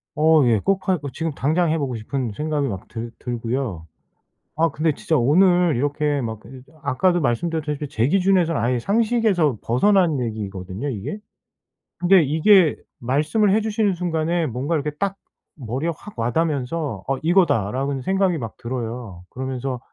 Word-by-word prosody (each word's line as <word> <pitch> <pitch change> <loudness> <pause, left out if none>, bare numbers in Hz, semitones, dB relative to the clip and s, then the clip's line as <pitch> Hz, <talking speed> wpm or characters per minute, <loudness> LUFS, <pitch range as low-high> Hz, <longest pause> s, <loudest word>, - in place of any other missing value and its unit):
어 155 0 +5
예. 110 -3 +3
꼭 195 - -1
할 185 -4 +2
어 140 - -3
지금 160 0 -2
당장 160 +5 +1
해 160 - +1
보고 135 -5 -2
싶은 120 +2 -3
생각이 150 +1 -1
막 95 -5 -6
들 115 0 -6
들고요. 115 -7 -3 0.7
아 165 +2 +3
근데 155 +2 0
진짜 165 -1 0
오늘 175 +5 +4
이렇게 145 +2 0
막 110 -3 -4
근데 125 +4 -12
저 155 +2 -22
아까도 175 +6 +1
말씀드렸다시피 150 +3 -1
제 120 0 0
기준에선 185 -3 +2
아예 120 +1 +1
상식에서 205 - +1
벗어난 165 - +3
얘기거든요 100 0 -4
이게. 120 - -4 0.8
근데 180 -1 +5
이게 160 +3 +4 0.2
말씀을 155 - +1
해 220 - +2
주시는 215 -2 0
순간에 170 -1 -1
뭔가 130 +7 -2
이렇게 150 0 -1
딱 195 -1 -1 0.4
머리에 130 +4 -3
확 210 - -13
와 115 +1 -1
닿으면서 150 -7 -1
'어 135 - 0
이거다.'라는 140 - +1
생각이 190 +1 +1
막 115 -5 -7
들어요. 115 -6 -6
그러면서 130 0 -4
145 Hz, 340 characters per minute, -22 LUFS, 120-175 Hz, 0.8 s, 어